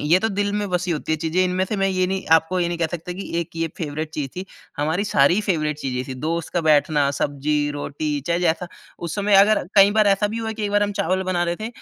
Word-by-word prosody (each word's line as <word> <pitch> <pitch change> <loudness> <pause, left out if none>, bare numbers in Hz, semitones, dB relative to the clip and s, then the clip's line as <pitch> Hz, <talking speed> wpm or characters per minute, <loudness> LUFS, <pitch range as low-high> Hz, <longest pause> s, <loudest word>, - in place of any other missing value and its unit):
ये 160 +5 +4
तो 225 - +1
दिल 205 0 -1
में 205 -1 -2
बसी 180 0 -1
होती 160 0 -2
है - - +2
चीज़ें, 165 +3 0
इनमें 185 +1 0
से 210 +2 -3
मैं 195 0 +1
ये 185 -1 +1
नहीं 190 0 -3
आपको 160 +3 +3
ये 170 - +1
नहीं 170 -1 -3
कह 165 - +1
सकता 175 +1 -5
कि 195 +2 -7
एक 165 - -6
ये 165 0 -1
फ़ेवरेट 155 -1 -4
चीज़ 145 -3 -3
थी। 185 - -4 0.3
हमारी 160 +7 0
सारी 175 +1 +3
फ़ेवरेट 155 -7 -1
चीज़ें 125 -2 -3
थी। 130 - -4
दोस्त 165 +2 -3
का 175 - +2
बैठना, 150 -2 +3
सब्जी, 145 +1 -1
रोटी 145 0 -3
चाहे 170 0 +1
जैसा 170 +1 0 0.3
उस 170 -2 -5
समय 205 0 +1
अगर 215 +2 +3
कई 200 0 +7
बार 215 -1 +3
ऐसा 200 +1 +3
भी 225 +2 -4
हुआ 220 -1 -3
कि 215 -1 -4
एक 205 - -2
बार 205 0 +2
हम 205 0 0
चावल 185 +2 0
बना 175 -1 +1
रहे 170 0 -2
थे 220 +1 -5
175 Hz, 265 wpm, -22 LUFS, 155-195 Hz, 0.3 s, कई